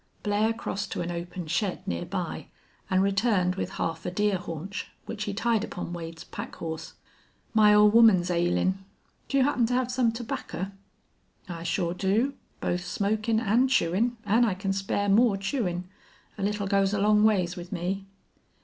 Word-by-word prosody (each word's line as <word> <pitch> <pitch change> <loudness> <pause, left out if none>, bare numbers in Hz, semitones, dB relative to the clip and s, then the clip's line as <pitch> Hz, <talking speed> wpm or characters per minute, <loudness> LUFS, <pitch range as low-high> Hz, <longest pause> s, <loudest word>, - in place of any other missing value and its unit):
Blair 210 +2 +2
crossed 200 -3 -4
to - - -2
an 175 0 -3
open 175 +1 -5
shed 175 +5 -2
near 85 -1 -2
by - - -4 0.4
and 185 0 +3
returned 200 -2 +2
with 190 - -4
half 165 0 -3
a - - -2
deer 205 +2 +1
haunch, 180 +3 -6 0.2
which 210 -2 -4
he 205 - -2
tied 225 0 +1
upon 180 -4 -5
Wade's 165 -1 -7
pack - - -7
horse. 160 -1 -6 0.6
"My 215 -2 +6
ole 210 0 +7
woman's 210 -6 +6
ailin'. 175 +2 +1 0.5
Do 275 - +1
you 270 - +5
happen 255 -4 +2
to 245 - 0
hev 250 -1 0
some 245 -2 +2
terbaccer? 225 -4 -5 0.8
"I 170 -2 -6
sure 170 0 -1
do 205 +9 +1 0.3
both 180 0 -1
smokin' 215 +4 0
an' 230 +3 +3
chewin', 235 0 +1
an' 220 +4 +4
I 215 -6 +2
can 195 0 -2
spare 195 +1 -1
more 210 +1 +4
chewin'. 195 -4 -2 0.5
A 205 - -8
little 205 +1 -1
goes 195 0 +2
a - - 0
long 210 +1 +4
ways 185 -5 +2
with 175 0 -8
me." 190 +2 -3
200 Hz, 175 wpm, -27 LUFS, 180-220 Hz, 0.8 s, ole